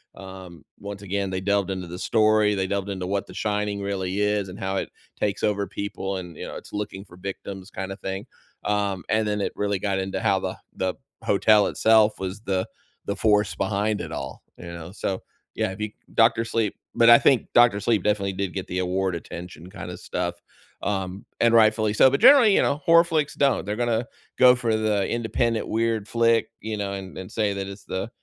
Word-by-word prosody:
um, 95 -3 -11 0.2
once 100 0 -7
again, 100 0 -2
they 95 0 -3
delved 100 -1 +1
into 90 -2 -4
the 90 +2 -7
story, 110 -2 +3
they 95 -1 -1
delved 100 0 -2
into 95 -2 -4
what 100 0 -2
The - - -11
Shining 105 -1 -1
really 100 0 -2
is 105 -2 0
and 95 +4 -9
how 95 -1 -2
it - - -3 0.3
takes 100 -2 -1
over 100 -2 +1
people 100 -1 -4
and, 90 -3 -8
you - - -6
know, - - -8
it's - - -13
looking 105 -1 -5
for 90 - -16
victims 95 0 -7
kinda 95 0 -5
thing, 95 0 -5 0.4
um, 100 -4 0
and 110 0 +2
then 105 -1 -1
it - - -1
really 100 -1 0
got 100 -1 -1
into 95 0 -3
how - - +2
the - - -4 0.2
the 95 -1 -1 0.3
hotel 105 +1 +4
itself 110 -1 +3
was 95 +2 -4
the 95 -3 -1 0.4
the 100 - -2
force 105 -1 +2
behind 100 +2 -1
it - - -6
all, - - -6
you 85 - -10
know? 85 0 -8
So, 95 -2 -3 0.3
yeah, 110 -4 -1
be 105 +1 -5 0.2
Doctor 115 0 +4
Sleep, 115 -3 -1 0.2
but 115 0 +5
I 120 - +10
think 135 -3 +3
Doctor 120 -4 +5
Sleep 110 -4 +1
definitely 100 -2 0
did 95 -1 -3
get 95 - -4
the 90 - -2
award 95 0 0
attention 90 +1 -8
kinda - - -7
stuff, 85 0 -3 0.5
um, 95 -1 -3
and 115 0 +4
rightfully 110 -1 +4
so, 130 - +6
but 140 - 0
generally, 250 -8 +8
you - - +4
know, 145 - +1
horror 170 +2 +6
flicks 155 -3 0
don't. 135 -8 +2
They're 105 +1 -2
gonna 120 -1 0 0.3
go 125 0 +7
for 115 -3 0
the 105 -3 +1
independent 115 0 -1
weird 115 -2 0
flick, 115 -1 +2
you 110 0 -3
know, 100 -1 -3
and 95 -1 -7
and 95 - -8
say 105 -3 0
that 100 0 -4
it's 100 +1 -10
the 95 +4 -4
100 Hz, 205 wpm, -24 LUFS, 95-110 Hz, 0.5 s, I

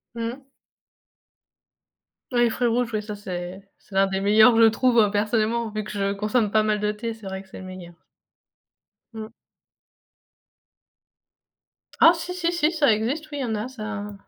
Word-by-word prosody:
Mmh. 235 +4 -5 1.9
Oui 240 -1 +3
fruits 240 +1 0
rouges 240 0 0
ouais 215 - -1
ça 210 0 -7
c'est 180 -1 -6 0.2
c'est 195 - -20
l'un 195 0 +4
des 190 0 -2
meilleurs 215 +4 +6
que 230 - +4
je - - +8
trouve, 240 +2 +2
heu, 205 -2 +4
personnellement, 220 +2 0
vu 215 0 -4
que 215 - -8
je 200 -1 -1
consomme 210 +1 0
pas 215 0 +3
mal 215 -1 0
de 210 0 0
thé, 230 +2 -5
c'est 220 -3 -11
vrai 190 0 -5
que 190 - -24
c'est - - -10
le 190 - -9
meilleur. 185 -2 -10 1.2
Mmh. 220 0 -8 2.7
Ah 330 - +8
si 350 +2 -5
si 345 -1 -1
si, 335 -2 +1
ça 295 -7 +3
existe, 275 +9 -2
oui, 290 - -5
il - - -2
y - - -1
en 220 -2 -2
a 215 +4 -3
ça 215 -4 -6
220 Hz, 180 wpm, -24 LUFS, 205-240 Hz, 2.7 s, je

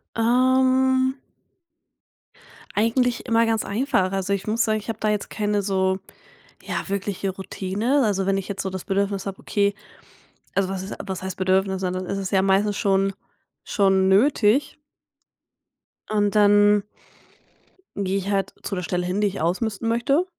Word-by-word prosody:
Ähm 260 +2 +3 1.6
eigentlich 235 +3 +1
immer 230 0 +3
ganz 225 -1 0
einfach. 200 -4 0
Also, 195 0 -2
ich 195 +1 -3
muss 225 +2 +1
sagen, 215 -1 +1
ich 210 - -13
habe 220 -1 -4
da 215 - 0
jetzt 210 -1 -1
keine 210 -1 -1
so, 190 -1 0 0.6
ja - - -4
wirkliche 200 0 -2
Routine. 195 +7 -1
Also, 195 -3 0
wenn 195 - +2
ich 195 - -5
jetzt 200 - -3
so 190 - -3
das 190 -1 -6
Bedürfnis 200 0 -1
habe, 195 -1 -5
okay, 200 -1 0 0.8
also 195 -1 +2
was 190 -1 -4
ist 195 - -6
was 190 -2 -5
heißt 190 0 -5
Bedürfnis? 190 0 +1
Ne, 185 - -1
dann 185 0 -4
ist 195 - -3
es 195 -2 -4
ja 190 - +3
meistens 195 +2 +2
schon 195 0 +1 0.5
schon 190 -2 +2
nötig. 230 +5 +3 1.3
Und 205 -1 +1
dann 205 0 +5 1.1
gehe 195 -1 -1
ich 195 +1 -3
halt 195 0 -1
zu 200 - -3
der 180 - -3
Stelle 180 0 -2
hin, 180 +3 -1
die 210 - +3
ich 195 - -4
ausmisten 200 +6 -1
möchte. 275 +9 +2
200 Hz, 160 wpm, -23 LUFS, 190-220 Hz, 1.6 s, dann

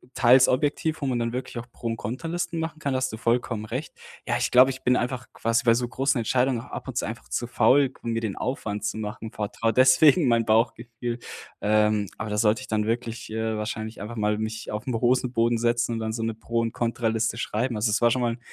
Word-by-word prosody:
teils 130 +1 +6
objektiv, 150 +4 0
wo 140 - -1
man 125 -2 0
dann 115 0 -2
wirklich 125 0 -5
auch 120 - -5
Pro 120 - -6
und 115 - -2
Kontra-Listen 165 - -3
machen 160 -1 -4
kann, 140 -3 -1
da - - +1
hast 130 0 -1
du 110 - -6
vollkommen 115 -1 0
recht. 130 +8 -5 0.3
Ja, - - +1
ich - - -1
glaube, 130 +2 +7
ich 130 0 -6
bin 125 - +3
einfach 125 0 -2
quasi 115 +1 0
bei 115 - +6
so 120 +1 0
großen 135 +1 0
Entscheidungen 125 +1 +1
auch - - -14
ab - - -6
und - - -6
zu - - 0
einfach - - -7
zu 120 - -2
faul, 125 +3 +4
um 115 - -2
mir 115 0 -1
den 110 -4 -3
Aufwand 105 -5 -3
zu - - -2
machen, 110 +1 -6
vertraue 110 +2 -2
deswegen 135 +5 +6
mein 115 -1 +3
Bauchgefühl. 115 +1 0 0.4
Ähm, 105 0 +2
aber 110 - -4
da 105 - -2
sollte 110 +1 +2
ich 130 - -9
dann 105 -1 0
wirklich, 115 0 -3
äh, 110 0 -2
wahrscheinlich 110 +1 -5
einfach 105 +3 -6
mal 105 -1 0
mich 110 0 -4
auf 105 0 -4
'n 125 - -1
Hosenboden 120 0 +2
setzen 120 0 +1
und 115 - -2
dann 110 0 -3
so 115 - -3
'ne 115 -1 -2
Pro 115 +1 -2
und 115 -1 -1
Kontra-Liste 115 -1 -1
schreiben. 115 +2 -1
Also 105 +1 +1
es 105 - +1
war 120 0 +5
schon 125 - +1
mal 120 -1 +1
'n 120 - -10
115 Hz, 245 wpm, -25 LUFS, 110-125 Hz, 0.4 s, glaube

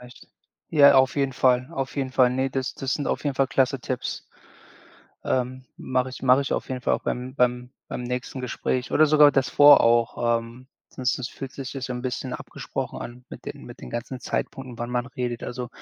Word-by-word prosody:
recht. 125 0 -14 0.4
Ja, 140 -3 +7
auf 130 +1 +4
jeden 135 -1 +1
Fall, 125 0 +2
auf 135 -1 -4
jeden 130 -2 -2
Fall. 125 -2 +4
Ne, 130 +1 0
das 130 -1 -3
das 135 -1 -2
sind 145 - -3
auf - - -2
jeden 140 -2 0
Fall 135 - +3
klasse 135 0 +1
Tipps. 125 0 -4 1.0
Ähm, 130 0 -1
mache 130 0 -1
ich, 130 - -10
mache 130 +1 +5
ich 140 - -2
auf - - -2
jeden 130 -1 -4
Fall - - +1
auch - - -4
beim 125 +2 -3
beim 125 -1 +1 0.2
beim - - -5
nächsten 125 +2 -4
Gespräch 125 0 -2
oder 155 - +5
sogar 150 -1 +7
das 135 -2 +1
vor 145 -1 +8
auch, 115 0 +2
ähm, 115 +2 -12 0.2
sonst 125 -1 -1
das 130 -1 -4
fühlt 135 -1 -8
sich 135 -1 -6
ja 135 - -4
so 130 0 -4
'n 125 0 -5
bisschen 130 -1 -3
abgesprochen - - -6
an 125 +1 -9
mit - - -11
den - - -7
mit - - -11
den 60 - -9
ganzen 125 +2 -5
Zeitpunkten, 130 -1 -4
wann 120 +1 -4
man 125 0 -1
redet, 125 -2 -4
also, 125 0 -5
130 Hz, 215 wpm, -25 LUFS, 125-135 Hz, 1.0 s, vor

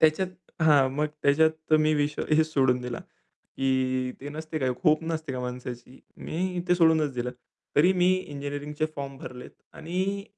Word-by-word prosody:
त्याच्यात 160 +4 +4 0.3
हां, 145 -4 +5
मग 150 +2 0 0.2
त्याच्यात 155 +2 +2
मी 155 0 +3
विषय 145 0 0
हेचं 155 +1 +5
सोडून 130 -5 +2
दिला 125 -1 -4 0.6
की 130 -1 0
ते 140 - -6
नसते 155 +1 -5
काय, 130 -2 0 0.2
होप 155 0 +4
नसते 160 -3 -3
का 125 - -3
माणसाची. 125 0 -7 0.2
मी 180 +1 -3
ते 180 - +5
सोडूनच 160 -4 +4
दिलं. 125 0 -2 0.5
तरी 175 +6 +6
मी 180 -1 +3
इंजिनिअरिंगचे 145 -2 -3
फॉर्म 140 -1 -5
भरलेत 125 0 -9 0.2
आणि 190 +4 -2
150 Hz, 155 wpm, -27 LUFS, 130-160 Hz, 0.6 s, तरी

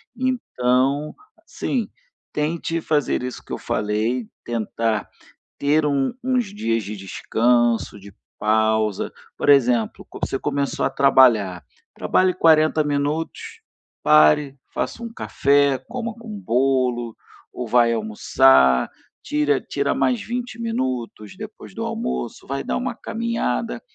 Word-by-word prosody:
Então, 145 - 0 0.3
sim, 240 -5 -2 0.4
tente 165 +2 -2
fazer 150 -5 0
isso 125 0 -6
que - - -8
eu - - -2
falei, 110 +3 -1 0.2
tentar 115 -1 -2 0.5
ter 150 +2 +2
um 140 -2 +1
uns 250 -2 +1
dias 115 - -1
de 105 +2 -6
descanso, 115 +3 +1
de 100 +1 -13 0.3
pausa. 110 -1 +1 0.2
Por - - -2
exemplo: 125 -5 +3
co - - -10
você 135 - -3
começou 140 -1 -1
a - - 0
trabalhar, 120 -10 +4 0.3
trabalhe 185 -1 +2
40 155 -2 +4
minutos, 145 +2 -3 0.4
pare, 75 - +5 0.2
faça 235 - -3
um 230 - -5
café, 140 - +2
coma 235 -1 -4
com 230 0 -13
bolo 125 - 0 0.4
ou 125 -2 -4
vai 120 0 +4
almoçar, 65 - +3 0.3
tira 145 -2 +1
tira 140 0 -1
mais 245 -3 +1
20 240 +2 -5
minutos 130 - -3
depois - - -10
do - - -5
almoço, 65 0 -4
vai 135 0 -3
dar - - -2
uma 250 -2 -3
caminhada. 230 0 -2
135 Hz, 125 wpm, -22 LUFS, 115-160 Hz, 0.5 s, pare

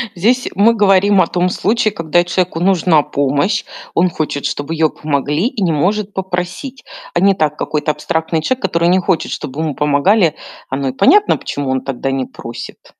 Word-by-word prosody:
Здесь 240 +8 +1
мы 215 +4 +4
говорим 200 -2 +4
о 170 - +2
том 180 0 0
случае, 215 +4 0
когда 175 -3 +1
человеку 175 -1 -1
нужна 180 -4 +3
помощь, 145 +9 0 0.3
он 180 +2 +3
хочет, 155 -3 -3
чтобы 145 +3 -3
её 160 -1 +2
помогли, 150 - -1
и 250 -4 -5
не 180 -3 +2
может 200 +6 0
попросить. 190 +8 -4 0.3
А - - +1
не 195 +2 +4
так: 150 -4 -1
какой-то 150 0 -1
абстрактный 160 +2 -2
человек, 260 +11 -1
который 170 -2 +1
не 185 +1 +4
хочет, 180 -3 -1
чтоб 130 - -6
ему 155 -3 -2
помогали- 155 +4 +2 0.3
оно 135 0 -2
и - - -5
понятно, 400 - +4
почему 140 -2 -4
он 130 0 0
тогда 135 0 -3
не 135 -1 -1
просит. 120 -1 -10
170 Hz, 180 wpm, -16 LUFS, 150-195 Hz, 0.3 s, мы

